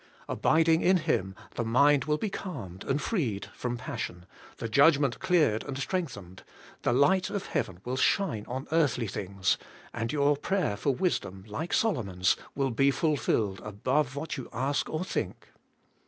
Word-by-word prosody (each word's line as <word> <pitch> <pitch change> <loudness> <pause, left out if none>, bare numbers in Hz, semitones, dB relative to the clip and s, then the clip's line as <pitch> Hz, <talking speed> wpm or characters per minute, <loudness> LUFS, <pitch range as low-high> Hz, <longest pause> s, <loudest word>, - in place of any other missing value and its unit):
Abiding 160 0 +3
in 185 +1 +5
Him, 95 - -1 0.2
the 120 - -2
mind 140 +5 +4
will 150 0 +1
be 210 +4 -3
calmed 110 - -6
and 135 +2 0
freed 140 - -1
from 120 -1 -3
passion, 90 -5 -5 0.3
the 115 - -3
judgment 140 +1 +4
cleared 165 - +2
and 135 - -5
strengthened, 130 - -4 0.4
the - - +1
light 180 +9 +3
of 200 - -3
heaven 90 0 -3
will 125 +1 -2
shine 130 - +1
on 130 +3 -4
earthly 145 -7 +2
things, 95 -1 -1 0.3
and 115 0 -2
your 145 0 +3
prayer 160 - 0
for 110 - -1
wisdom, 130 - -1
like 150 +11 -4
Solomon's, 100 - +2 0.2
will 135 -2 0
be 135 +4 +3
fulfilled 125 - 0
above 130 +6 0
what 155 +2 -4
you 130 - -7
ask 135 +5 -1
or 155 +3 -2
think. - - -4
135 Hz, 155 wpm, -29 LUFS, 110-160 Hz, 0.4 s, in